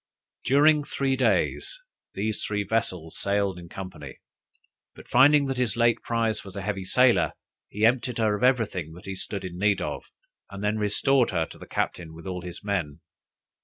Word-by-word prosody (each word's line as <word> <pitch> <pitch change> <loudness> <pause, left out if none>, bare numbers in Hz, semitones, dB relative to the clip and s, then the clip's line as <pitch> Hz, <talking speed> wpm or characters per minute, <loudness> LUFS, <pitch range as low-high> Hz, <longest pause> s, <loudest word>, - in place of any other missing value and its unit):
During 150 +3 +4
three 135 -2 -1
days, 135 - 0 0.4
these 105 +2 -2
three 105 -1 -1
vessels 95 -6 -2
sailed 100 -2 0
in 85 -1 -11
company, 75 -9 -8 0.8
but - - -14
finding 140 +3 +5
that 135 -2 -2
his 120 -3 0
late 120 -1 +3
prize 115 -2 -1
was 100 -2 -11
a 100 - -5
heavy 95 -2 -3
sailer, 125 +4 +3 0.4
he 105 +2 +1
emptied 125 0 +1
her 110 -2 +2
of 105 - -6
everything 110 - +1
that 90 - -13
he 95 - -4
stood 95 +1 -5
in 90 -1 -7
need 105 0 +2
of, - - -4 0.4
and 100 0 -8
then 105 +1 0
restored 125 +5 +2
her 80 - 0
to - - -14
the - - -11
captain 80 -2 -3
with 85 - -12
all 90 -1 -4
his 90 +2 -9
men. 85 -7 -2
105 Hz, 180 wpm, -26 LUFS, 95-120 Hz, 0.8 s, finding